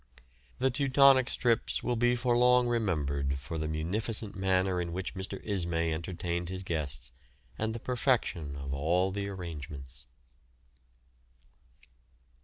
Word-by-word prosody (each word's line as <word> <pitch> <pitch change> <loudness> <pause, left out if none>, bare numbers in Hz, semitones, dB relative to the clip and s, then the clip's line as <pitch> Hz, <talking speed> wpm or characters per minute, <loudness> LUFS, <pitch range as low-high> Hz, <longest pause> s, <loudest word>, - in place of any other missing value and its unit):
The 130 +1 +2
"Teutonic's" 135 -1 +5
trips 115 -3 +1
will 125 - 0
be 120 +1 +3
for 120 0 +1
long 125 0 +5
remembered 70 - 0
for 70 +4 -5
the 80 - -2
munificent 100 +8 -2
manner 95 -1 +1
in 85 -1 -4
which 95 +1 -4
Mr. 95 0 -5
Ismay 85 -5 0
entertained 85 +1 -3
his 95 0 -3
guests, 75 -8 -3 0.4
and 110 +1 -2
the - - -4
perfection 115 - 0
of 70 -1 -5
all 85 +7 +1
the 100 +1 -3
arrangements. 75 -8 -8
95 Hz, 125 wpm, -30 LUFS, 80-115 Hz, 0.4 s, Teutonic's